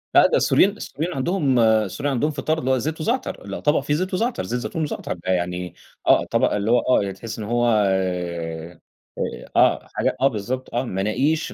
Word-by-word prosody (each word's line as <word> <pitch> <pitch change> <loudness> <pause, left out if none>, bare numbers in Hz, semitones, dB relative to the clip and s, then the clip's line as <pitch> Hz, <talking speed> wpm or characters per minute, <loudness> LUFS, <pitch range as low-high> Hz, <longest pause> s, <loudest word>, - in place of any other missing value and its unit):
لأ، - - +8
ده - - +2
السوريين 195 - +4
السوريين 170 -3 -4
عندهم 140 -3 +1
السوريين 110 +5 +2
عندهم 150 +5 +1
فطار 155 +3 -1
اللي 130 -1 0
هو 130 - +3
زيت 155 +6 -3
وزعتر، 240 +10 -2
لا - - -5
طبق 150 0 +2
فيه 145 +1 -2
زيت 185 +5 -1
وزعتر، 230 +6 0
زيت 125 +2 -2
زيتون 160 +6 -3
وزعتر 150 - -3
ده 90 +2 -4
يعني 90 -1 -2 0.3
آه - - +5
طبق - - +1
اللي 105 +2 0
هو 120 - +5
آه 100 -6 +1
تحس 115 +4 -7
إنه 105 0 -5
هو 120 0 +2 0.2
آآ، 85 -3 -2 0.8
آه، - - +4
حاجة - - 0
آه 135 - +6
بالضبط 125 +2 -4
آه 120 - +1
مناقيش 130 +9 0
120 Hz, 195 wpm, -22 LUFS, 95-150 Hz, 0.8 s, لأ